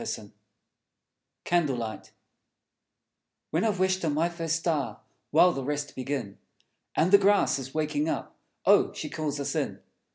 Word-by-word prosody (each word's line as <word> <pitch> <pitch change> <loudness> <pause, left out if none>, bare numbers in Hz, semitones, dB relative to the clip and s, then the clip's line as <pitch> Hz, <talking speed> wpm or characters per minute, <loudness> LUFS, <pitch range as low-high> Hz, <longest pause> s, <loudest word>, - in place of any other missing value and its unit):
_ - - -5 1.1
Candle 170 -6 +1
Light 110 -4 -5 1.4
When 165 +5 +1
I've 215 -4 +1
wished 185 0 +1
on 155 -3 0
my 165 +3 +2
first 165 -2 -2
star, 150 -10 -1 0.3
While 170 +4 +6
the 135 -5 -4
rest 145 +1 -3
begin, 130 -6 -4 0.6
And 175 +4 +2
the 200 - +9
grass 200 -6 +3
is 135 +1 -8
waking 150 0 0
up, - - -4 0.3
Oh, - - +5
She - - -6
calls 150 -2 -3
us 140 - -2
in! - - -2
155 Hz, 150 wpm, -28 LUFS, 140-175 Hz, 1.4 s, the